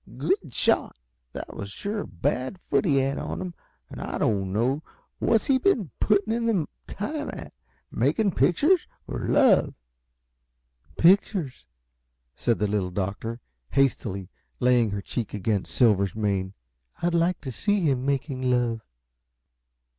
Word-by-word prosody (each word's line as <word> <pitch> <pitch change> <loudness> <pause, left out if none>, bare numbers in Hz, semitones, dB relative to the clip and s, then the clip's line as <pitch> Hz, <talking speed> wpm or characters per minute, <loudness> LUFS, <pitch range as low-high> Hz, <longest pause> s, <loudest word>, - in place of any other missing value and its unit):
"Good 160 +1 0
shot! 110 - +1 0.4
That - - -7
was 100 - -6
sure 205 - -4
a - - -4
bad 130 - -2
foot - - 0
he 150 -6 +3
had 135 +1 +1
on - - -4
him, 185 -2 -5 0.3
and - - -9
I - - -5
didn't 95 -3 0
know 125 +8 +1 0.4
What's 225 -2 +2
he 265 -1 +3
been 235 - +1
putting 210 +1 +2
in 230 0 0
the 190 -9 +1 0.2
time 295 +8 -4
at? - - -9 0.4
Making 215 -4 +2
pictures 295 - +3 0.2
or - - -4
love?" 260 -9 +4 1.2
"Pictures," 175 - +3 0.7
said 120 -2 +1
the 105 - 0
Little 100 -3 0
Doctor, 100 +5 -4 0.3
hastily, 110 -8 +1 0.3
laying 125 -3 +4
her 100 0 -3
cheek 115 0 -4
against 105 0 -1
Silver's 100 -6 +3
mane. 100 -3 -1 0.5
"I'd 175 0 +2
like 170 +1 +2
to 135 -2 -5
see 205 - +1
him 135 -6 +1
making 135 -1 -1
love!" 120 -2 +1
135 Hz, 140 wpm, -26 LUFS, -, 1.2 s, love